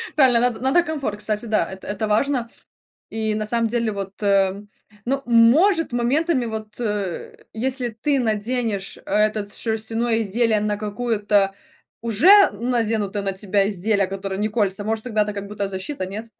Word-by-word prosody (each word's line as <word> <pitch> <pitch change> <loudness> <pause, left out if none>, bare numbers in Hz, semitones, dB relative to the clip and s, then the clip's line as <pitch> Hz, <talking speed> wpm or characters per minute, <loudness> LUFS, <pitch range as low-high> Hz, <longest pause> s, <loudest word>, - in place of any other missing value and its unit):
Правильно 260 -5 +5
надо 245 -1 0
надо 265 +7 +3
комфорт, 285 -10 -3
кстати, 210 +1 -2
да, 215 -6 +1
это 190 0 -10
это 205 +1 -2
важно 235 +2 0 0.6
и 220 -1 -2
на 215 0 -2
самом 230 +1 +1
деле 230 -2 -1
вот, 195 -1 -7
э, 195 0 +2 0.4
ну, 270 +2 -1
может, 265 - +4
моментами 260 +4 +1
вот, 220 0 -7
э, 205 -5 -3 0.2
если 250 +1 -1
ты 270 +6 0
наденешь 220 -3 -1
этот 210 0 0
шерстяное 225 +1 -1
изделие 220 +2 +1
на 210 0 -1
какую-то 210 -2 0 0.5
уже 340 - +6
наденуто 215 -3 -1
на 195 - -1
тебя 200 +1 0
изделие, 200 0 0
которое 195 0 -4
не 210 +1 0
колется, 205 -2 0
может 220 +1 -2
тогда 220 -4 +1
это 210 - -3
как 200 -1 -6
будто 200 -1 -4
защита, 190 +4 -4
нет? 205 +4 -6
220 Hz, 155 wpm, -22 LUFS, 205-240 Hz, 0.6 s, уже